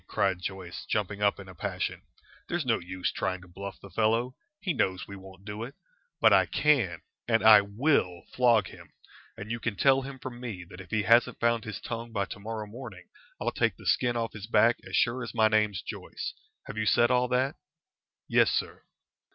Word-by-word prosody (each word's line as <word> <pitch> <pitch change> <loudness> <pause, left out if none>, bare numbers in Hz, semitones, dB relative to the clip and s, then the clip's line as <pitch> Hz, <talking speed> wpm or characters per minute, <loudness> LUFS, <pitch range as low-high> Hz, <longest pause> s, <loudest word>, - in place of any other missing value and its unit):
cried 95 -2 0
Joyce, 95 -2 -6
jumping 105 -1 -1
up 100 -1 +2
in 95 - -10
a 95 - -10
passion. 80 - -3 0.5
"There's 175 -4 -1
no 115 -2 +2
use 90 +1 -3
trying 95 0 -2
to 90 - -14
bluff 100 +2 -8
the 100 - -13
fellow. 115 +5 +1 0.2
He 185 -5 -1
knows 95 -8 -1
we 100 - -8
won't 95 0 -13
do 105 +1 -6
it. 125 +5 -6 0.4
But - - +6
I - - +5
can 120 - +2 0.2
and 115 -1 +2
I 110 -1 +9
will 100 - 0
flog 120 -5 +4
him, - - -13 0.5
and 105 +3 -7
you 115 - -2
can 115 -2 -2
tell 135 +5 +4
him 135 0 -7
from 125 -1 -8
me 110 -8 -6
that 90 - -9
if 90 - -13
he 110 -1 0
hasn't 115 +2 +4
found 115 0 +1
his 110 -2 -5
tongue 115 0 -6
by 100 -3 -1
to 105 - -9
morrow 110 +1 -5
morning 105 -5 -10 0.3
I'll - - -1
take - - +1
the - - -14
skin 120 -1 +2
off 115 -1 -2
his 105 -1 -8
back 115 +1 +4
as - - -4
sure 125 +1 +2
as 120 - -6
my 110 -1 +5
name's 105 -3 +1
Joyce. - - -6 0.3
Have 110 - -6
you 110 - 0
said 120 +3 +4
all 125 0 +3
that?" 130 +2 0 0.7
"Yes, - - +4
sir." - - -2
110 Hz, 210 wpm, -28 LUFS, 100-120 Hz, 0.7 s, I